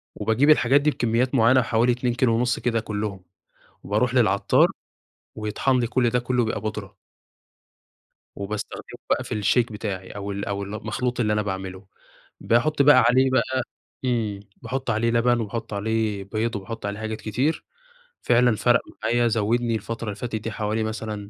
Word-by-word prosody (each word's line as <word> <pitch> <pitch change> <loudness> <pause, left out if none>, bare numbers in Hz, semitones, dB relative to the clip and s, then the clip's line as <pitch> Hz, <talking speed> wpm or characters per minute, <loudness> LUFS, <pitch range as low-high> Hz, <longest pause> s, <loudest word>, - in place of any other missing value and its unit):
وباجيب 110 +8 +2
الحاجات 140 -1 +5
دي 150 - +3
بكميات 120 +1 0
معيّنة 130 +2 +5
حوالي 120 +1 +2
2.5 120 0 +1
كده 115 -2 0
كلّهم 105 -3 -4 0.6
وباروح 115 +5 0
للعطّار، 110 -6 +4 0.7
ويطحن 110 +5 0
لي 120 - +1
كلّ 120 0 +1
ده 125 - +1
كلّه 125 0 0
بيبقى 110 - -2
بودرة. 105 -3 -5 1.4
وباستخدمه 105 +1 -6
بقى - - +1
في 105 - -3
الShake 120 +2 +2
بتاعي، 100 -3 -5
أو 100 0 -5
ال 100 +1 -4
أو 100 0 -3
المخلوط 110 +5 -3
اللي 105 -3 +1
أنا 105 0 +1
باعمله، 95 -1 -5 0.5
باحط 140 +6 +2
بقى 135 -4 +7
عليه 130 +2 +4
بقى 130 0 +1 0.4
امم، 110 -5 -1 0.2
باحط 130 +2 -3
عليه 115 +1 +1
لبن 120 +1 +2
وباحط 115 +1 -5
عليه 105 -1 -1
بيض 110 +3 -2
وباحط 105 +2 -6
عليه 100 +1 -4
حاجات 110 0 -4
كتير، 130 +9 -1 0.6
فعلًا 120 -1 +3
فرَق 120 +3 +3 0.2
معايا 120 +2 +2
زوّدني 115 +2 +1
الفترة 115 +1 -5
اللي 105 - -3
فاتت 115 +2 -5
دي 110 +1 -4
حوالي 110 +1 -2
مثلًا، 110 -2 -5
115 Hz, 155 wpm, -24 LUFS, 105-125 Hz, 1.4 s, بقى